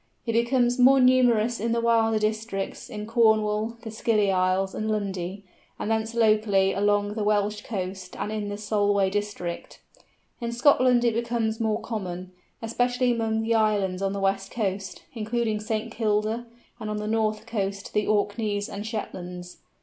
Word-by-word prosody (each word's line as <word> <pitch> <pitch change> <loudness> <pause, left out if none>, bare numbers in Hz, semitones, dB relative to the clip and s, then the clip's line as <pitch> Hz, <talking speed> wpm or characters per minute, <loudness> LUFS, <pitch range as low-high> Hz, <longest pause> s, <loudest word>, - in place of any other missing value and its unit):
It 230 - -1
becomes 240 +1 +2
more 265 +2 +7
numerous 245 -3 +4
in 230 +2 0
the 235 - +1
wilder 225 -1 +3
districts, 215 -2 -3
in 210 0 -6
Cornwall, 220 0 +2
the 225 - -6
Scilly 215 -2 +1
Islands, 185 +1 +1
and 215 0 -3
Lundy, 195 -2 -3 0.3
and 215 - -3
thence 220 +1 -1
locally 215 -4 +3
along 205 +1 +1
the 215 -1 -2
Welsh 210 0 +1
coast 185 -3 -5
and 210 - -3
in 210 -1 -3
the 205 - -4
Solway 205 -2 +1
district. 205 -4 -4 0.6
In 235 -1 -3
Scotland 250 -1 +4
it 235 - +3
becomes 230 -1 -1
more 220 -1 0
common, 185 -5 -5 0.3
especially 245 +2 +1
among 225 -1 0
the 230 +1 +1
islands 205 -4 +1
of 195 0 0
the 200 - -3
west 195 0 0
coast, 195 -4 -3
including 225 -1 -1
St. 215 +1 -3
Kilda, 220 +1 0 0.3
and 215 - -5
on 210 - -2
the 210 - -4
north 215 -1 0
coast 200 -2 -3
to - - -10
the 210 - +1
Orkneys 205 0 0
and 200 - -6
Shetlands. 180 -5 -6
215 Hz, 165 wpm, -26 LUFS, 200-230 Hz, 0.6 s, more